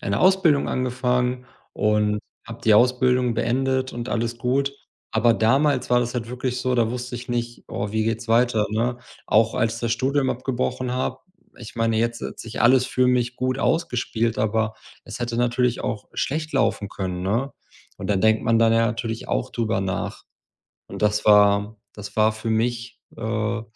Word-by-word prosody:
eine 100 0 -1
Ausbildung 185 -6 +4
angefangen 125 0 -1 0.3
und 105 0 +1 0.3
habe 115 +1 -9
die 110 -2 +5
Ausbildung 125 +1 +3
beendet 130 +2 0
und 120 +1 -5
alles 115 0 -2
gut. 135 +3 0 0.4
Aber 115 +1 +3
damals 135 +3 +2
war 125 - +4
das 120 0 -3
halt 115 -2 -3
wirklich 125 0 -3
so, 130 0 0
da 115 -2 +2
wusste 125 0 -5
ich 120 +1 -9
nicht: 120 0 -3
„Oh, 100 - -3
wie 110 0 0
geht's 115 +1 -2
weiter?“, 115 -2 +3
ne? 120 +3 -1 0.3
Auch 110 +1 +3
als 115 +1 0
das 115 -1 -1
Studium 135 +2 +1
abgebrochen 125 0 -2
habe 130 - -2 0.4
ich 115 -2 -10
meine, 115 -1 +1
jetzt 115 0 -1
hat - - -6
sich 115 0 -5
alles 125 +1 +5
für 130 0 +1
mich 125 -1 +1
gut 130 +1 -1
ausgespielt, 115 -8 0
aber 110 0 0 0.3
es 110 0 -8
hätte 120 -1 -3
natürlich 120 0 +1
auch 115 -5 -4
schlecht 155 +2 -2
laufen 130 -6 +1
können, 90 -2 -4
ne? 115 +9 -1 0.5
Und - - -5
dann 95 -2 +1
denkt 110 0 +3
man 115 0 +3
dann 115 0 +5
ja 115 0 +3
natürlich 115 -1 -4
auch - - -1
drüber 110 -4 -1
nach 95 -1 -3 0.7
und - - -8
das 105 0 +1
war 105 0 +4 0.2
das 105 -1 -9
war 110 0 +4
für 110 +1 -5
mich, 120 +1 -2 0.2
äh 110 0 -2
120 Hz, 175 wpm, -23 LUFS, 110-125 Hz, 0.7 s, die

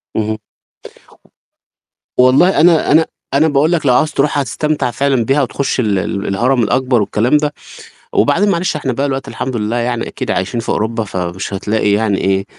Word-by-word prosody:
اهم. 110 0 -1 1.8
والله 135 +9 +4
أنا 165 -1 +4
أنا 160 +2 +5 0.3
أنا 145 +3 +3
باقول 150 +2 +2
لك 165 -4 0
لو 125 - +4
عاوز 150 +5 +2
تروحها 145 0 0
هتستمتع 150 -2 -2
فعلًا 135 -3 0
بِيها 135 +5 +2
وتخش 135 +1 -2
ال 105 -5 +1
ال 100 +2 -3
الهرم 120 +5 +1
الأكبر 125 +1 +1
والكلام 115 +8 +1
ده، 150 0 -1 0.6
وبعدين 205 +4 +2
معلش 175 -4 0
إحنا 135 -4 -2
بقى 140 +4 -1
الوقتي 135 -1 -4
الحمد 130 -1 -4
لله 110 +2 -2
يعني 120 -1 -2
أكيد - - -5
عايشين 100 +6 -1
في - - -10
أوروبا 115 +1 -1
فمش 95 0 -4
هتلاقي 105 +1 0
يعني 105 -2 +1
إيه، 95 0 0
125 Hz, 170 wpm, -15 LUFS, 110-145 Hz, 1.8 s, أنا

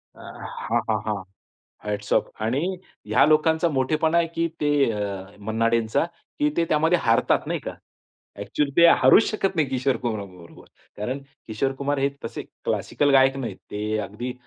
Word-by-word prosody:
अ, - - -15 0.5
हां, - - +2
हां, - - +2
हां. 105 -3 -2 0.6
Hats 105 0 -4
off. - - +2
आणि 115 +6 0 0.5
ह्या 110 +6 +4
लोकांचा 160 +2 +3
मोठेपणा 155 +4 +1
आहे 170 - +3
की 165 0 +1
ते 145 - +2 0.2
अ, 100 -2 -5
मन्नाडेंचा 115 +4 +1 0.3
की 150 - +3
ते 170 - +3
त्यामध्ये 160 +3 +3
हारतात 115 0 +2
नाही - - -1
का? - - -6 0.7
ॲक्चुअली 145 -2 -1
ते 170 - +8
हारूच 210 +5 +6
शकत 195 -4 -1
नाही, 155 -4 +2
किशोर 130 0 0
कुमार 110 -4 -2
बरोबर. 90 -3 -15 0.3
कारण 125 +7 -3 0.3
किशोर 115 +5 -1
कुमार 145 +1 0
हे 140 +1 +2
तसे 115 - -5 0.2
क्लासिकल 145 -1 0
गायक 135 0 +5
नाहीत. 115 -8 -5
ते 105 +1 -2
अगदी 120 +5 -5
130 Hz, 160 wpm, -24 LUFS, 105-150 Hz, 0.7 s, ते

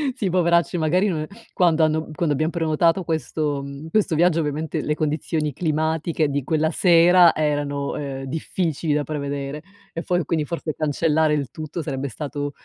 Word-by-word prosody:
Sì, 195 - -1
poveracci 170 -1 +2
magari 175 +5 +2
non 165 -6 -1
e 155 - -5 0.3
quando 170 -3 +3
hanno 155 0 -1
quando 155 -1 0
abbiamo 155 +4 0
prenotato 165 +2 +1
questo, 155 -3 -2
mhmm, 140 +3 -8
questo 190 -2 +1
viaggio 170 0 +3
ovviamente 150 +1 -2
le 150 - -1
condizioni 155 0 -1
climatiche 160 +1 0
di 140 0 -2
quella 155 +3 +1
sera 175 0 +6
erano, 145 -2 -1
uhm, 135 -2 -5
difficili 160 +2 -2
da 145 0 0
prevedere 140 0 -4 0.3
e 165 - -3
fo 180 0 0
quindi 160 +1 0
forse 160 0 -4
cancellare 155 0 +1
il 140 -5 -2
tutto 155 +3 -6
sarebbe 140 -3 -3
stato, 145 +3 -4
155 Hz, 165 wpm, -22 LUFS, 145-165 Hz, 0.3 s, sera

